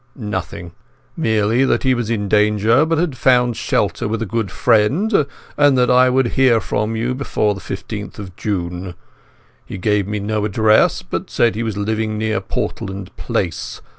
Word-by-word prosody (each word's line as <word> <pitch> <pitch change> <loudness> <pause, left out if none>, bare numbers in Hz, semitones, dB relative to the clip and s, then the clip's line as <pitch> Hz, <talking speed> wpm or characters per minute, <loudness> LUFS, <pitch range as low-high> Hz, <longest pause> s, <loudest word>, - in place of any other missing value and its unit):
"Nothing. 95 -6 -5 0.4
Merely 110 -4 +1
that 135 - +1
he 130 -1 +3
was 120 -3 -2
in 105 -3 -1
danger, 105 +7 +3
but 165 0 +1
had 160 -4 0
found 125 -2 +3
shelter - - -1
with 115 +2 -2
a 115 - -2
good 110 -1 -2
friend, 140 - +2 0.3
and 145 -2 +4
that 125 0 +3
I 125 +1 +5
would 130 -1 +2
hear 130 -3 +3
from 110 +1 -2
him 120 +3 -1
before 110 -6 0
the 100 - -9
15th 100 +2 -6
of 95 -4 -9
June. 90 -2 -4 0.7
He - - -8
gave 105 0 0
me 105 0 -2
no 105 +1 -2
address, 110 - +3
but - - -5
said 120 -1 +2
he 110 - -4
was 110 -3 -3
living 110 +1 -1
near 110 0 -1
Portland 95 -1 -5
Place. 85 -2 -3
110 Hz, 170 wpm, -19 LUFS, 105-125 Hz, 0.7 s, I